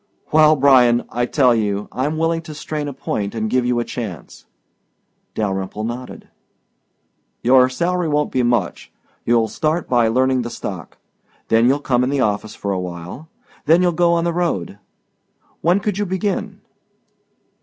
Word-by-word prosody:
"Well, 155 Hz, 0 st, +6 dB
Bryan, 130 Hz, -4 st, +4 dB
I 120 Hz, +1 st, -1 dB
tell 130 Hz, -4 st, +3 dB
you, 105 Hz, -2 st, -1 dB
I'm 145 Hz, +5 st, -2 dB
willing 165 Hz, +1 st, 0 dB
to 155 Hz, -, -7 dB
strain 150 Hz, 0 st, -4 dB
a -, -, -3 dB
point 105 Hz, -5 st, -4 dB
and 110 Hz, -1 st, -2 dB
give 125 Hz, -1 st, +1 dB
you 125 Hz, -1 st, +1 dB
a 120 Hz, -, -2 dB
chance." 105 Hz, -, -7 dB, 0.9 s
Dalyrimple 95 Hz, 0 st, -3 dB
nodded. 120 Hz, +3 st, -6 dB, 1.2 s
"Your 130 Hz, +1 st, +5 dB
salary 175 Hz, +6 st, -1 dB
won't 150 Hz, -1 st, 0 dB
be 130 Hz, -, +1 dB
much. 120 Hz, -7 st, -1 dB, 0.4 s
You'll 115 Hz, -1 st, +3 dB
start 155 Hz, +8 st, -1 dB
by 120 Hz, -2 st, +3 dB
learning 130 Hz, +2 st, +2 dB
the 120 Hz, -, -5 dB
stock. 95 Hz, -7 st, -7 dB, 0.5 s
Then 115 Hz, +1 st, +4 dB
you'll 135 Hz, +3 st, +3 dB
come 125 Hz, -3 st, +1 dB
in 125 Hz, -, 0 dB
the 140 Hz, 0 st, 0 dB
office 105 Hz, -2 st, -1 dB
for 100 Hz, -, -4 dB
a 95 Hz, -, -1 dB
while. 90 Hz, -, -7 dB, 0.4 s
Then 165 Hz, +4 st, +5 dB
you'll 175 Hz, -, +3 dB
go 170 Hz, 0 st, +2 dB
on 170 Hz, 0 st, +1 dB
the 170 Hz, 0 st, 0 dB
road. 105 Hz, -, -2 dB, 0.8 s
When 175 Hz, +4 st, +3 dB
could 205 Hz, -1 st, -2 dB
you 205 Hz, -, -1 dB
begin?" 190 Hz, +2 st, -3 dB
125 Hz, 165 wpm, -19 LUFS, 110-155 Hz, 1.2 s, Well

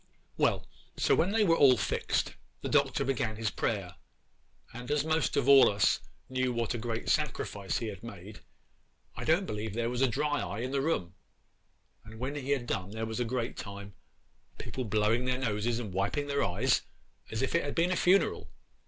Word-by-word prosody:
'Well, -, -, +1 dB, 0.3 s
so -, -, +3 dB
when 175 Hz, -, +3 dB
they 220 Hz, +1 st, +3 dB
were 165 Hz, -5 st, +4 dB
all 135 Hz, -5 st, +6 dB
fixed, -, -, -1 dB, 0.3 s
the -, -, -3 dB
Doctor -, -, +2 dB
he -, -, -3 dB
began 125 Hz, -5 st, 0 dB
his 110 Hz, 0 st, -2 dB
prayer; 95 Hz, -6 st, -2 dB, 0.8 s
and 125 Hz, +1 st, -8 dB
as 150 Hz, 0 st, +1 dB
most 160 Hz, 0 st, +1 dB
all 140 Hz, 0 st, +7 dB
of 100 Hz, -, -2 dB
us 100 Hz, -, +3 dB, 0.3 s
knew 130 Hz, -1 st, 0 dB
what 115 Hz, -1 st, -1 dB
a 120 Hz, -, -3 dB
great 115 Hz, 0 st, -4 dB
sacrifice 120 Hz, -9 st, -1 dB
he 115 Hz, -, -3 dB
had 100 Hz, -3 st, -6 dB
made, 105 Hz, -2 st, -10 dB, 0.8 s
I -, -, -5 dB
don't 170 Hz, +5 st, +3 dB
believe 105 Hz, -, -4 dB
there 115 Hz, 0 st, -1 dB
was 125 Hz, +1 st, -2 dB
a 135 Hz, -, +5 dB
dry 145 Hz, +4 st, 0 dB
eye 105 Hz, -, -4 dB
in 130 Hz, +2 st, -3 dB
the 140 Hz, 0 st, +1 dB
room; 115 Hz, -, -1 dB, 0.9 s
and 110 Hz, +1 st, -12 dB
when 130 Hz, +4 st, -3 dB
he 140 Hz, -2 st, -5 dB
had 140 Hz, -4 st, +1 dB
done 95 Hz, -5 st, -2 dB
there 110 Hz, +2 st, -4 dB
was 110 Hz, +1 st, -4 dB
a 120 Hz, -, +1 dB
great 120 Hz, 0 st, -3 dB
time—people 100 Hz, +5 st, -9 dB
blowing 110 Hz, +3 st, +1 dB
their 125 Hz, 0 st, +1 dB
noses 115 Hz, -2 st, -1 dB
and 110 Hz, -6 st, -5 dB
wiping 100 Hz, +10 st, 0 dB
their 140 Hz, 0 st, 0 dB
eyes 90 Hz, -2 st, +2 dB, 0.5 s
as 110 Hz, +3 st, -2 dB
if 130 Hz, -, -1 dB
it 170 Hz, -, +2 dB
had 145 Hz, -, -4 dB
been 175 Hz, +2 st, +2 dB
a -, -, +2 dB
funeral. 185 Hz, +3 st, +2 dB
120 Hz, 195 wpm, -30 LUFS, 105-140 Hz, 0.9 s, all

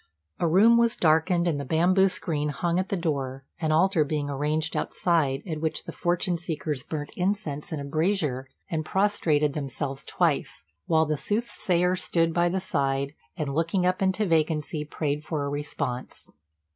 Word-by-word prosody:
A 170 Hz, -, +2 dB
room 210 Hz, +8 st, +6 dB
was 235 Hz, 0 st, +3 dB
darkened, 165 Hz, +2 st, +3 dB
and 145 Hz, -4 st, 0 dB
a -, -, -4 dB
bamboo 180 Hz, +7 st, +3 dB
screen 150 Hz, -4 st, -2 dB
hung 170 Hz, +4 st, 0 dB
at 185 Hz, -, -2 dB
the 195 Hz, -, 0 dB
door, 135 Hz, -5 st, -2 dB
an 160 Hz, -2 st, 0 dB
altar 170 Hz, +1 st, +4 dB
being 145 Hz, -1 st, -2 dB
arranged 150 Hz, +3 st, -1 dB
outside 150 Hz, -6 st, +1 dB
at 155 Hz, -3 st, -4 dB
which 160 Hz, -1 st, -1 dB
the -, -, -7 dB
fortune 175 Hz, 0 st, 0 dB
seekers 155 Hz, -4 st, -3 dB
burnt 145 Hz, +1 st, -5 dB
incense 180 Hz, -6 st, -2 dB
in 155 Hz, -, -3 dB
a -, -, -5 dB
brazier, 155 Hz, -4 st, 0 dB, 0.2 s
and 160 Hz, -2 st, -2 dB
prostrated 155 Hz, -6 st, +1 dB
themselves 140 Hz, -1 st, -4 dB
twice, 80 Hz, -, -1 dB, 0.2 s
while 160 Hz, -1 st, +4 dB
the 155 Hz, 0 st, -1 dB
soothsayer 185 Hz, -3 st, 0 dB
stood 165 Hz, -2 st, +1 dB
by 175 Hz, +1 st, +3 dB
the 190 Hz, +2 st, 0 dB
side, 140 Hz, -5 st, -1 dB, 0.2 s
and, 145 Hz, -3 st, -2 dB
looking 170 Hz, +4 st, +1 dB
up 185 Hz, +1 st, +1 dB
into 190 Hz, +3 st, +2 dB
vacancy, 155 Hz, -2 st, 0 dB
prayed 150 Hz, 0 st, -2 dB
for 150 Hz, -2 st, -2 dB
a -, -, -2 dB
response. 140 Hz, -3 st, -4 dB
160 Hz, 170 wpm, -26 LUFS, 145-180 Hz, 0.2 s, room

